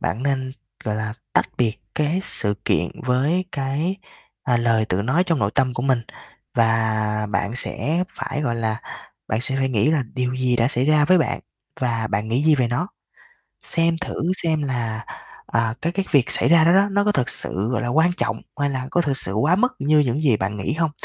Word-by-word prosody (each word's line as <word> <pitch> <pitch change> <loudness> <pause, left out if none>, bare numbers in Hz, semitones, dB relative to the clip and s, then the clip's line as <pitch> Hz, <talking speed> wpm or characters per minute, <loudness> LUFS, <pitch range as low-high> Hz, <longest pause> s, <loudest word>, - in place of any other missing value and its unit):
bạn 120 - -2
nên, 130 -2 -1 0.3
gọi 105 -3 -1
là, 110 0 -3 0.2
tách - - +3
biệt 115 -2 +1 0.2
cái 155 +5 0
sự 105 - +2
kiện - - +1 0.2
với 140 +9 +1
cái, 145 +6 -1 0.5
à, 125 -4 +1
lời 115 -2 +2
tự 100 -2 -1
nói 140 - +2
trong 165 -4 0
nội 100 -4 +1
tâm 130 -2 +1
của 120 - -3
mình 130 -2 +2 0.5
và 110 -2 +1
bạn 105 +4 -1
sẽ 165 +6 -1
phải, 135 -4 -4
gọi 120 -5 0
là, 110 -1 -2 0.5
bạn 110 - 0
sẽ 130 +2 0
phải 135 0 +1
nghĩ 115 +1 +2
là 155 -3 +2
điều 125 -1 -1
gì 130 -1 +1
đã 115 +1 +2
xảy 130 -2 +4
ra 150 0 +4
với 185 +4 +5
bạn 160 - 0 0.4
và 115 -3 0
bạn 105 +1 -2
nghĩ 120 +5 +1
gì 155 0 +5
về 130 -4 +1
nó? 140 +10 -1 0.7
Xem 165 0 +1
thử 185 - -4 0.3
xem 160 -2 +1
là, 115 -5 -3 0.4
ờ, 115 0 0
cái 170 - 0
cái 195 +2 -1
việc 135 -4 +3
xảy - - +2
ra 165 -1 +6
đó 170 - +5
đó, 195 +2 +4
nó 200 +1 +2
có 210 - +2
thực 125 -10 0
sự, 100 +4 -1
gọi 125 -1 -1
là, 120 - -2
quan 160 +7 +3
trọng, - - -2 0.2
hay 145 0 +1
là 130 -1 -4
có 175 - +2
thực 145 -5 0
sự 95 - -2
quá 145 - +2
mức 250 +5 +2
như 150 +2 +3
những 145 0 +1
gì 130 -8 +4
bạn 100 +1 -3
nghĩ 100 - -2
hông? 160 -1 0
130 Hz, 220 wpm, -22 LUFS, 115-155 Hz, 0.7 s, ra